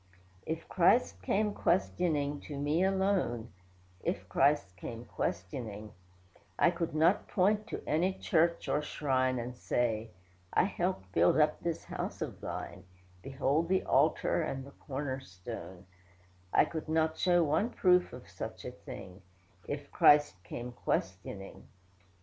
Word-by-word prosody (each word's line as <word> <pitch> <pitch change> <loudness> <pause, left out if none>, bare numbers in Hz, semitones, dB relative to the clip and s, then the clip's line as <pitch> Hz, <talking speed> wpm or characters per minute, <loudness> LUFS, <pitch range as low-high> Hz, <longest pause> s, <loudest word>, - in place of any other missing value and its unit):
If - - -3
Christ 90 - +3
came 210 - +1
questioning, 155 -6 +1
to 145 - -5
me 150 +5 +1
alone, 190 - +1 0.5
(If 95 - -2
Christ 135 -2 +2
came 115 +6 -7
questioning,) 105 +3 -4 0.7
I 170 - +5
could 170 -3 -3
not 165 +6 +3
point 210 +3 +2
to - - -5
any 175 +5 +1
church 170 -2 +1
or 150 - +1
shrine 130 -3 0
And 120 +1 -4
say, 115 -2 -1 0.4
'I - - +5
helped 180 - -2
build 85 - +4
up 150 0 +3
this 170 -1 -2
house - - -5
of - - -5
Thine; - - -6 0.4
Behold 140 +4 0
the 190 0 +2
altar, - - +2
and 135 0 -3
the 140 - -12
corner 135 -1 -4
stone'; 95 -4 -9 0.7
I - - +5
could 160 -1 -6
not 160 0 +1
show 175 -1 +4
one 160 +9 +1
proof 180 -5 +3
of - - -10
such - - -7
a - - -4
thing; 90 +1 -10 0.5
If - - -5
Christ 145 -11 +5
came 120 +7 -6
questioning. 95 -4 -4
145 Hz, 140 wpm, -32 LUFS, 115-170 Hz, 0.7 s, I